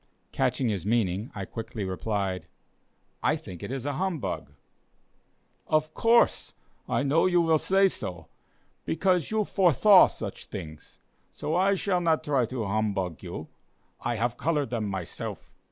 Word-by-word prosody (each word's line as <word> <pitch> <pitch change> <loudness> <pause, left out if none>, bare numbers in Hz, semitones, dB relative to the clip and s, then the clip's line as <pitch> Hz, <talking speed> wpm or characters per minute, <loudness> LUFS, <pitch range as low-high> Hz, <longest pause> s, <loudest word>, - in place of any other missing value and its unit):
Catching 130 - 0
his 100 -5 -2
meaning, 105 -1 0
I 100 -1 -4
quickly 115 +1 -6
replied: 95 -1 -2 0.7
"I - - +2
think 90 -3 -9
it - - -5
is 135 -1 -4
a 145 - -1
humbug." 175 -2 -3 1.2
"Of 155 0 +1
course, 235 +1 +3 0.3
I - - +1
know 145 +6 +3
you 175 -1 +3
will 165 -2 +3
say 195 +4 +4
so; 90 - -5 0.6
because 180 0 +1
you 215 0 +1
'forstha' 195 +1 +6
such - - -7
things; 75 -1 -9 0.3
so 155 - -4
I 190 +3 +3
shall 185 -1 0
not 165 -2 +2
try 135 -5 +1
to 120 -2 -3
humbug 100 -4 -1
you; 85 -4 -7 0.5
I 120 - -1
have 120 +2 -1
color 150 -3 +1
them 115 -3 -3
myself." 95 -4 -6
130 Hz, 145 wpm, -27 LUFS, -, 1.2 s, forstha